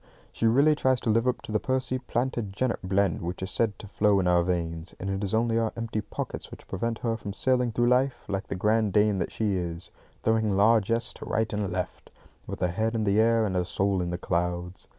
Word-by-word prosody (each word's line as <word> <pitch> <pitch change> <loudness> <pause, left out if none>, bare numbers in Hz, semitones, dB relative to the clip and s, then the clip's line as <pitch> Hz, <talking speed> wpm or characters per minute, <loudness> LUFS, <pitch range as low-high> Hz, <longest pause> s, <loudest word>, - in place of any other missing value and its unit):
She 115 - 0
really 140 +7 +5
tries 130 -3 +2
to 110 - +1
live 115 +3 +2
up 125 - 0
to - - -7
the 105 - +1
Percy 130 -1 0
Plantagenet 120 -2 -2
blend 95 -1 +1
which 90 +2 -4
is 95 - -3
said 110 -3 0
to 105 - -10
flow 105 0 +2
in 90 - +1
our 90 -1 +4
veins; 85 -1 -2
and 95 +1 -3
it 95 +1 -2
is 100 +2 0
only 115 0 +2
our 115 -1 0
empty 115 -2 -2
pockets 105 - -5
which - - -12
prevent 115 +4 -2
her 115 -1 +1
from 105 -3 -6
sailing 125 +1 +1
through 120 +2 +1
life, 130 +1 +1
like 95 0 -3
the - - -3
grande 105 +1 +1
dame 105 -1 +3
that - - -2
she 105 -3 0
is, 85 -1 -4 0.3
throwing 110 -3 +2
largesse 115 +2 +3
to - - -9
right 110 -1 -1
and 105 -2 -1
left, 90 -1 -4 0.4
with - - -6
her 90 - +2
head 110 +5 -1
in 110 - 0
the 100 0 +2
air 115 0 +4
and 95 -3 -2
her 90 - +2
soul 95 +1 0
in 90 - -2
the 90 - -2
clouds. 90 0 -2
105 Hz, 230 wpm, -27 LUFS, 95-115 Hz, 0.4 s, really